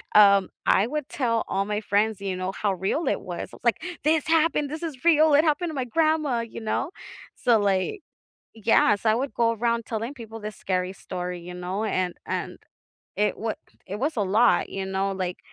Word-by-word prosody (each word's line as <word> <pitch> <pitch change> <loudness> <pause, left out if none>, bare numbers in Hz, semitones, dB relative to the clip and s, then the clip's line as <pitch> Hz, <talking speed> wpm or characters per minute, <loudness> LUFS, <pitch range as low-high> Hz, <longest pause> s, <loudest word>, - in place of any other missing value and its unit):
um, 200 -2 +7 0.2
I 200 - +4
would 300 +1 -3
tell 230 -4 0
all 195 - 0
my 210 0 -1
friends, 210 0 +1
you 195 -2 -2
know, 185 +1 -2
how 200 0 0
real 190 - -1
it - - 0
was, - - -6
I - - -9
was, - - -29
like, - - +2 0.2
"This 315 0 +2
happened! 320 -2 +2
This 310 +2 -5
is 310 -4 -6
real, 315 -2 +5
it 300 - +6
happened 315 +3 +1
to - - -7
my 260 -2 -1
grandma," 310 -2 +1
you 230 - -7
know? 225 +8 -1 0.4
So, 235 -3 +3
like 200 - 0 0.5
Yes, 220 -1 +3
I 215 - +5
would 260 0 -2
go 230 0 +2
around 230 0 0
telling 230 +3 -3
people 225 -3 -9
this 210 0 -6
scary 185 0 -1
story, 180 -2 -5
you 180 +1 -8
know? 180 +4 -3
And 185 -4 0
and - - -3 0.6
it 210 0 +1
wa 220 0 -2 0.3
it 195 - -4
was 295 +5 -1
a - - +1
lot, 210 +5 +3
you 195 0 -4
know, 190 +1 -1
like, 185 -2 -3
220 Hz, 205 wpm, -25 LUFS, 195-275 Hz, 0.6 s, um